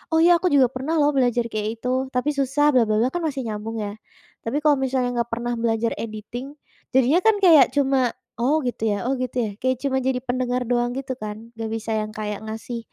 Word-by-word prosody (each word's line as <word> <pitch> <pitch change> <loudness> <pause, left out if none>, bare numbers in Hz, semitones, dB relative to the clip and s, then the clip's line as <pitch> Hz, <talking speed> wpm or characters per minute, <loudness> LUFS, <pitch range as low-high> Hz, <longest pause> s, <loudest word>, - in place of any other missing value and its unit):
Oh, 325 - +5
ya 345 0 +6
aku 370 - +1
juga 260 -3 +5
pernah 270 +6 -3
loh 295 -1 +3
belajar 245 -4 +2
kayak 215 -1 -2 0.2
itu 255 +1 0
tapi 280 +4 +1
susah 285 +1 +2
bla, 245 -4 +3
bla, 215 - +1
bla 255 - +2
kan 350 - -2
masih 275 -4 -3
nyambung 220 0 -5
ya, 205 - -4 0.5
tapi 290 +6 -1
kalau 295 -2 +4
misalnya 260 -2 0
nggak 235 0 -1
pernah 240 +1 -3
belajar 230 0 0
editing 230 +5 -6 0.4
jadinya 265 +6 +4
kan 445 -1 +6
kayak 320 -7 +8
cuma, 270 -3 +2 0.3
oh 295 +6 +2
gitu 240 - -4
ya 205 - +1
oh 260 - +1
gitu 255 -1 -4
ya - - -3
kayak 260 0 +1
cuma 270 -1 +1
jadi 260 0 0
pendengar 250 0 -1
doang 240 0 +1
gitu 270 -1 -3
kan, 210 0 -5 0.2
nggak 225 -1 -5
bisa 225 0 -4
yang 215 - -4
kayak 210 -1 -3
ngasih 225 +2 -5
255 Hz, 220 wpm, -23 LUFS, 230-275 Hz, 0.5 s, kayak